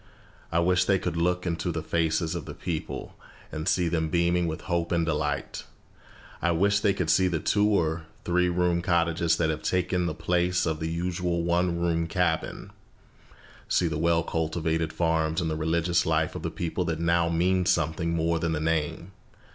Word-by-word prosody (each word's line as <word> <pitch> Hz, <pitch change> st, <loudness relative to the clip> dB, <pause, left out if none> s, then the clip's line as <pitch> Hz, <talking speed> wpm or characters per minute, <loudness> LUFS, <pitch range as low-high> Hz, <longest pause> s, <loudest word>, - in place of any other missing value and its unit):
I 85 Hz, -, 0 dB
wish 90 Hz, +1 st, +3 dB
they 95 Hz, 0 st, +3 dB
could 90 Hz, -2 st, -3 dB
look 90 Hz, +2 st, 0 dB
into 85 Hz, 0 st, -1 dB
the 80 Hz, -1 st, -4 dB
faces 80 Hz, 0 st, 0 dB
of -, -, -5 dB
the -, -, -8 dB
people, 85 Hz, -4 st, -5 dB, 0.4 s
and 80 Hz, +2 st, -5 dB
see 90 Hz, -3 st, +2 dB
them 80 Hz, -2 st, 0 dB
beaming 85 Hz, +1 st, +2 dB
with 80 Hz, -1 st, -4 dB
hope 85 Hz, -2 st, -2 dB
and 85 Hz, -1 st, +2 dB
delight. 75 Hz, -2 st, -2 dB, 0.8 s
I 85 Hz, -, +2 dB
wish 100 Hz, +4 st, +3 dB
they 100 Hz, -1 st, +2 dB
could 90 Hz, -5 st, 0 dB
see 95 Hz, +3 st, +4 dB
the 85 Hz, -3 st, -1 dB
two 105 Hz, +5 st, +2 dB
or 80 Hz, -5 st, 0 dB, 0.2 s
three 90 Hz, 0 st, +2 dB
room 90 Hz, -1 st, +1 dB
cottages 85 Hz, -1 st, +1 dB
that 80 Hz, -2 st, +1 dB
have 75 Hz, 0 st, -4 dB
taken 90 Hz, +1 st, 0 dB
the 80 Hz, -, -3 dB
place 90 Hz, +2 st, +1 dB
of 80 Hz, -2 st, -1 dB
the 80 Hz, 0 st, -2 dB
usual 85 Hz, 0 st, -1 dB
one 85 Hz, 0 st, +1 dB
room 85 Hz, -1 st, 0 dB
cabin, 85 Hz, -2 st, -1 dB, 1.0 s
see 90 Hz, -, +2 dB
the 80 Hz, -2 st, -2 dB
well 85 Hz, 0 st, +2 dB
cultivated 80 Hz, 0 st, -1 dB
farms 80 Hz, 0 st, 0 dB
and 80 Hz, -3 st, -1 dB
the -, -, -1 dB
religious 85 Hz, +2 st, +1 dB
life -, -, 0 dB
of -, -, -6 dB
the -, -, -2 dB
people 90 Hz, +1 st, -3 dB
that 85 Hz, -2 st, -2 dB
now 85 Hz, 0 st, +2 dB
means 90 Hz, +2 st, +1 dB
something 85 Hz, 0 st, 0 dB
more 85 Hz, 0 st, +1 dB
than 80 Hz, 0 st, -1 dB
the 75 Hz, -, -1 dB
name. 80 Hz, +3 st, -1 dB
85 Hz, 185 wpm, -27 LUFS, 80-90 Hz, 1.0 s, see